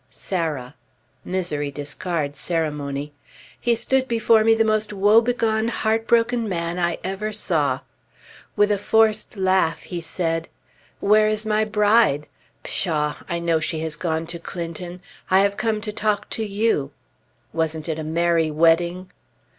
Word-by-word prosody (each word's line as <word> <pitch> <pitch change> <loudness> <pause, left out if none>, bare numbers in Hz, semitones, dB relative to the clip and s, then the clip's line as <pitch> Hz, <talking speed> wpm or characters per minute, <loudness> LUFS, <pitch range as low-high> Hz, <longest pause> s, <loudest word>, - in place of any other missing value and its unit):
"Sarah!" 155 -8 -3 0.5
(Misery 170 -6 -2
discards 145 +1 -4
ceremony.) 150 -3 -2 0.5
He 235 0 +2
stood 260 +3 0
before 225 -2 +3
me 225 0 +5
the 225 0 +2
most 215 -1 +1
woebegone, 220 +2 +3
heartbroken 230 +1 +1
man 170 -1 -2
I 170 -1 0
ever 195 +3 -3
saw. 155 -10 0 0.7
With 205 0 +3
a 205 - +1
forced 215 0 +2
laugh 190 -3 +1
he 175 -2 -5
said, 165 0 -2 0.5
"Where 215 +1 +4
is 215 0 0
my 215 0 +2
bride? 210 -8 +3 0.4
Pshaw! 150 -4 -1
I 170 - -1
know 170 -1 +1
she 155 0 -2
has 160 -1 -1
gone 160 0 -2
to 170 +1 -6
Clinton! 175 +1 -6 0.3
I 190 +1 +5
have 200 0 +1
come 220 -2 -1
to 210 -1 -5
talk 210 -1 -1
to 225 - -2
you. 205 -9 0 0.6
Wasn't 160 -1 -1
it 160 -1 -2
a - - -4
merry 165 0 +1
wedding?" 170 +4 +2
180 Hz, 140 wpm, -22 LUFS, 160-215 Hz, 0.7 s, me